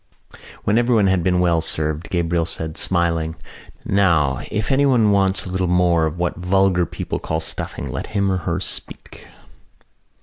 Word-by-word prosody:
When 105 Hz, +3 st, +2 dB
everyone 120 Hz, -4 st, +3 dB
had 95 Hz, -2 st, +2 dB
been 90 Hz, +1 st, +1 dB
well 85 Hz, -2 st, +2 dB
served 80 Hz, 0 st, -2 dB
Gabriel 85 Hz, -1 st, 0 dB
said, 80 Hz, -1 st, -4 dB
smiling: 85 Hz, -3 st, 0 dB, 0.5 s
"Now, 85 Hz, -10 st, +2 dB
if 105 Hz, +4 st, -2 dB
anyone 130 Hz, -6 st, +3 dB
wants 100 Hz, 0 st, +2 dB
a -, -, -6 dB
little 95 Hz, 0 st, -1 dB
more 85 Hz, -2 st, +3 dB
of 80 Hz, +2 st, -5 dB
what 90 Hz, -1 st, -2 dB
vulgar 90 Hz, -1 st, +2 dB
people -, -, -5 dB
call 80 Hz, -, -2 dB
stuffing 80 Hz, -3 st, -5 dB
let 65 Hz, -, -5 dB
him 100 Hz, -2 st, 0 dB
or 95 Hz, -, +1 dB
her 85 Hz, 0 st, -2 dB
speak." 95 Hz, -, -5 dB
90 Hz, 160 wpm, -20 LUFS, 80-95 Hz, 0.5 s, everyone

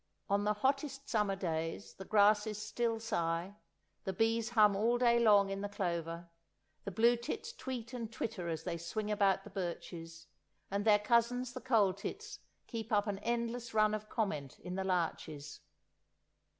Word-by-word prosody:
On 200 Hz, +1 st, +2 dB
the 210 Hz, 0 st, +2 dB
hottest 275 Hz, +4 st, -1 dB
summer 210 Hz, -3 st, +1 dB
days 165 Hz, -1 st, -3 dB
the 190 Hz, -, -9 dB
grasses 210 Hz, +1 st, +4 dB
still 225 Hz, +2 st, -1 dB
sigh; 185 Hz, -3 st, -2 dB, 0.5 s
the 190 Hz, -, -2 dB
bees 225 Hz, +3 st, +1 dB
hum 210 Hz, -4 st, +5 dB
all 230 Hz, +4 st, +2 dB
day 235 Hz, -1 st, +4 dB
long 205 Hz, -4 st, +5 dB
in 195 Hz, 0 st, -3 dB
the 205 Hz, -, -3 dB
clover; 170 Hz, -3 st, -3 dB, 0.6 s
the -, -, -2 dB
blue 230 Hz, +5 st, +4 dB
tits 240 Hz, -, -5 dB
tweet 255 Hz, -, -6 dB
and 230 Hz, -3 st, -5 dB
twitter 185 Hz, -6 st, -3 dB
as 160 Hz, -1 st, -3 dB
they 170 Hz, -1 st, -3 dB
swing 210 Hz, +6 st, -3 dB
about 195 Hz, -2 st, +3 dB
the -, -, -11 dB
birches, 170 Hz, -3 st, -5 dB, 0.5 s
and 200 Hz, +1 st, -1 dB
their 210 Hz, -2 st, +7 dB
cousins 235 Hz, +3 st, +1 dB
the -, -, -6 dB
coal 220 Hz, -7 st, +3 dB
tits 410 Hz, -, -6 dB, 0.3 s
keep 225 Hz, -2 st, -6 dB
up 205 Hz, -1 st, +3 dB
an 200 Hz, -2 st, -2 dB
endless 235 Hz, 0 st, -2 dB
run 215 Hz, 0 st, +4 dB
of 215 Hz, 0 st, -4 dB
comment 150 Hz, -, -2 dB
in 180 Hz, -, -7 dB
the 190 Hz, +1 st, -1 dB
larches. 160 Hz, -5 st, -2 dB
210 Hz, 165 wpm, -34 LUFS, 190-230 Hz, 0.6 s, their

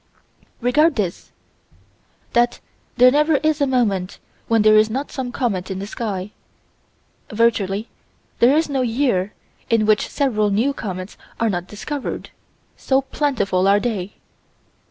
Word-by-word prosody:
Regard 300 Hz, +7 st, +3 dB
this: 195 Hz, -6 st, -3 dB, 1.0 s
That 240 Hz, 0 st, +2 dB, 0.4 s
there 250 Hz, +1 st, +7 dB
never 300 Hz, +3 st, +3 dB
is 310 Hz, +1 st, +1 dB
a 285 Hz, -, +3 dB
moment 205 Hz, -8 st, 0 dB, 0.3 s
when 225 Hz, -2 st, +3 dB
there 215 Hz, 0 st, +6 dB
is 215 Hz, 0 st, +5 dB
not 270 Hz, +6 st, -4 dB
some 255 Hz, -2 st, -4 dB
comet 200 Hz, -8 st, -2 dB
in 190 Hz, -, -4 dB
the 195 Hz, -, -5 dB
sky. 205 Hz, -2 st, -4 dB, 1.0 s
Virtually 215 Hz, -2 st, +1 dB, 0.5 s
there 255 Hz, +5 st, +5 dB
is 320 Hz, -, +1 dB
no 275 Hz, -3 st, -1 dB
year 230 Hz, -6 st, 0 dB, 0.4 s
in 225 Hz, -2 st, +3 dB
which 215 Hz, 0 st, +2 dB
several 215 Hz, -7 st, +1 dB
new 230 Hz, +8 st, +1 dB
comets 185 Hz, -5 st, -6 dB, 0.2 s
are 230 Hz, -2 st, +1 dB
not 175 Hz, -1 st, -3 dB
discovered, 270 Hz, +7 st, -6 dB, 0.4 s
so 265 Hz, 0 st, +1 dB
plentiful 205 Hz, -11 st, 0 dB
are 200 Hz, +1 st, +5 dB
they. 205 Hz, -4 st, -3 dB
230 Hz, 135 wpm, -20 LUFS, 200-265 Hz, 1.0 s, there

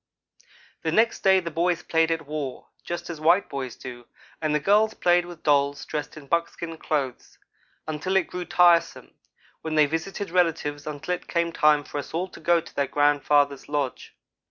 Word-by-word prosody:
The -, -, -1 dB
next 230 Hz, +1 st, +2 dB
day 190 Hz, -1 st, +5 dB
the 170 Hz, -2 st, -5 dB
boys 175 Hz, +2 st, 0 dB
played 160 Hz, 0 st, +2 dB
at 165 Hz, -2 st, -2 dB
war, 145 Hz, -3 st, -5 dB
just 175 Hz, 0 st, -5 dB
as 160 Hz, -2 st, -8 dB
white 170 Hz, +5 st, +4 dB
boys 130 Hz, -3 st, -5 dB
do; 120 Hz, -1 st, -9 dB, 0.4 s
and 155 Hz, -1 st, 0 dB
the -, -, +2 dB
girls 210 Hz, +7 st, +3 dB
played 175 Hz, 0 st, +2 dB
with 175 Hz, -2 st, -11 dB
dolls 140 Hz, -1 st, +2 dB
dressed 150 Hz, +1 st, -5 dB
in 150 Hz, -, -11 dB
buckskin 170 Hz, +1 st, -2 dB
clothes, 140 Hz, -5 st, -3 dB, 0.5 s
until 155 Hz, +5 st, -2 dB
it 190 Hz, -3 st, +3 dB
grew 180 Hz, 0 st, -6 dB
tiresome, 175 Hz, -1 st, +3 dB, 0.5 s
when 160 Hz, -1 st, -3 dB
they 155 Hz, -1 st, +6 dB
visited 165 Hz, +6 st, -4 dB
relatives 160 Hz, -5 st, 0 dB
until 150 Hz, +4 st, -3 dB
it 180 Hz, -, -6 dB
came 170 Hz, -1 st, 0 dB
time 150 Hz, -2 st, +3 dB
for 145 Hz, -, -5 dB
us 145 Hz, -, -7 dB
all 180 Hz, +3 st, -1 dB
to -, -, -13 dB
go 170 Hz, 0 st, +3 dB
to 165 Hz, -, -13 dB
their 140 Hz, -1 st, 0 dB
grandfather's 145 Hz, -1 st, +2 dB
lodge. 145 Hz, -3 st, -3 dB
160 Hz, 180 wpm, -25 LUFS, 145-175 Hz, 0.5 s, they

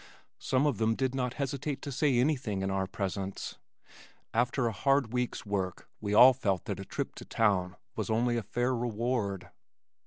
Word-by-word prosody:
Some 130 Hz, +2 st, +1 dB
of 140 Hz, -8 st, +1 dB
them 110 Hz, 0 st, +2 dB
did 130 Hz, +1 st, 0 dB
not 125 Hz, -2 st, -1 dB
hesitate 140 Hz, 0 st, -2 dB
to 140 Hz, -, -4 dB
say 135 Hz, -1 st, +2 dB
anything 125 Hz, -7 st, +1 dB
in 95 Hz, -, -1 dB
our 95 Hz, -1 st, 0 dB
presence. 95 Hz, 0 st, -4 dB, 0.7 s
After 120 Hz, +2 st, +1 dB
a 115 Hz, -, +1 dB
hard 135 Hz, +2 st, +1 dB
week's 125 Hz, -2 st, -2 dB
work 95 Hz, -3 st, -3 dB
we 105 Hz, -, -3 dB
all 130 Hz, +4 st, +9 dB
felt 100 Hz, -8 st, -1 dB
that -, -, -3 dB
a -, -, -6 dB
trip -, -, -4 dB
to -, -, -7 dB
town 95 Hz, -5 st, +1 dB, 0.2 s
was -, -, -3 dB
only 120 Hz, +2 st, +2 dB
a 115 Hz, -, 0 dB
fair 120 Hz, +5 st, 0 dB
reward. 115 Hz, -5 st, -2 dB
120 Hz, 180 wpm, -30 LUFS, 100-130 Hz, 0.7 s, all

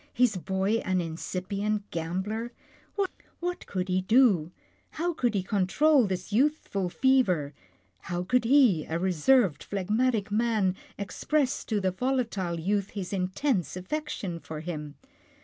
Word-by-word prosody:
His 245 Hz, -3 st, +3 dB
boy 190 Hz, +4 st, 0 dB
an 185 Hz, -3 st, 0 dB
incipient 195 Hz, +5 st, -3 dB
gambler 190 Hz, +8 st, -3 dB, 0.4 s
— 395 Hz, -2 st, -5 dB
What 355 Hz, +1 st, -4 dB
could 185 Hz, -1 st, -2 dB
he 185 Hz, 0 st, +1 dB
do, 195 Hz, -6 st, +4 dB, 0.5 s
how 345 Hz, +2 st, 0 dB
could 245 Hz, -8 st, 0 dB
he 190 Hz, -, +1 dB
control 220 Hz, +8 st, +3 dB
this 185 Hz, +2 st, -4 dB
youthful 230 Hz, -, +1 dB
fever, 185 Hz, -, +2 dB, 0.5 s
how 175 Hz, -, -3 dB
could 250 Hz, +6 st, +2 dB
he, 240 Hz, -, +5 dB
a 160 Hz, -, -2 dB
reserved, 185 Hz, -, +3 dB
phlegmatic 210 Hz, +2 st, 0 dB
man, 215 Hz, -4 st, +1 dB, 0.2 s
express 260 Hz, +8 st, -1 dB
to 215 Hz, -3 st, 0 dB
the 190 Hz, -1 st, +1 dB
volatile 205 Hz, -6 st, -1 dB
youth 200 Hz, +3 st, 0 dB
his 190 Hz, 0 st, -4 dB
intense 185 Hz, -, -1 dB
affection 195 Hz, -, -4 dB
for 155 Hz, 0 st, -7 dB
him? 150 Hz, -3 st, -6 dB
200 Hz, 130 wpm, -28 LUFS, 180-245 Hz, 0.5 s, he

